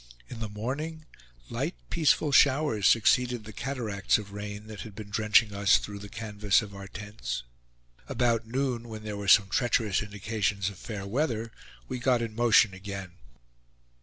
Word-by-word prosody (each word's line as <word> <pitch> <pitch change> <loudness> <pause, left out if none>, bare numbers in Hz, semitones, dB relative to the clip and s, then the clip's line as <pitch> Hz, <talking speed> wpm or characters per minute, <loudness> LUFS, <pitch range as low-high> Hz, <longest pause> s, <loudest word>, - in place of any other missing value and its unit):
In - - -8
the 110 -2 -4
morning, 145 +10 -4 0.5
light - - -2 0.2
peaceful 155 -1 +3
showers 140 -7 +4
succeeded 120 +1 +3
the 110 0 -10
cataracts 110 -5 0
of 100 -2 -9
rain, 105 0 -6
that 110 -1 -9
had 110 -3 -9
been 105 -1 -9
drenching 105 0 +3
us 100 0 +4
through 100 -1 -7
the 100 0 -9
canvas 105 -1 +1
of 100 -1 -9
our 100 0 -8
tents. 95 - -5 0.7
About 115 -2 +1
noon, 125 -1 -2
when 110 -1 -7
there 105 -1 -4
were 100 -1 -5
some 100 0 +6
treacherous 110 -3 +1
indications 105 -1 -2
of 100 - -14
fair 105 -5 -6
weather, 115 0 -1 0.4
we 130 - -4
got 125 -1 +2
in 115 -2 -5
motion 115 -3 +4
again. 95 -1 -7
110 Hz, 165 wpm, -28 LUFS, 100-120 Hz, 0.7 s, some